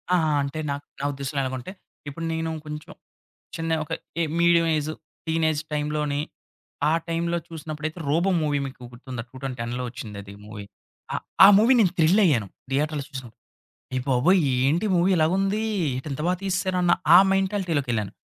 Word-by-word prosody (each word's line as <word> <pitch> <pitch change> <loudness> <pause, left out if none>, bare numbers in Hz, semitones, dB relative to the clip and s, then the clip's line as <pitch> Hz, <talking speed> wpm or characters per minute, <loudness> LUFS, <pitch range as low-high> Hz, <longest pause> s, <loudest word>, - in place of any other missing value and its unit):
ఆ! - - +5 0.2
అంటే 140 +3 -3
నాక్ 140 0 -4 0.2
నా - - -2
ఉద్దేశంలో 140 +1 -3
ఎలాగంటే, 130 +6 -4 0.4
ఇప్పుడు 165 +4 -5
నేను 160 0 -2 0.2
కొంచెం 150 0 -8 0.6
చిన్న 165 0 -1
ఒక 150 - -14 0.3
ఎ - - +3 0.2
మీడియం 170 -1 +5
ఏజ్, 150 +1 -2 0.4
టీనేజ్ 160 -2 +1
టైమ్‌లోని 150 -1 -1 0.7
ఆ - - +3
టైంలో 170 +1 0
చూసినప్పుడైతే 155 +1 -6
'రోబో' 170 +6 +2
మూవీ 150 -2 +1
మీకు 135 -2 -9
గుర్తుందా 125 -1 -7
2010లో 125 -2 -4
ఒచ్చింది 115 -4 -8
అది 100 0 -11
మూవీ. 105 -1 -8 0.5
ఆ! - - -1 0.3
ఆ - - +11
మూవీ 230 +5 +5
నేను 195 -6 +4
థ్రిలయ్యాను 160 - +4 0.2
థియేటర్‌లో 150 +1 0
చూసినప్పుడు 130 -4 -9 0.6
అయ్యబాబోయ్! 135 +8 +3 0.2
ఏంటి 165 +9 +2
మూవీ 175 +2 +3
ఇలాగ 160 +1 +3
ఉంది! 195 +3 0 0.3
ఏటి 130 +4 -5
ఇంత 145 - -5
బా 180 - +3
తీసేసారన్న 185 -2 +1 0.2
ఆ - - +12
మెంటాలిటీ‌‌లోకెళ్ళాను. 165 - 0
150 Hz, 150 wpm, -25 LUFS, 135-170 Hz, 0.7 s, ఆ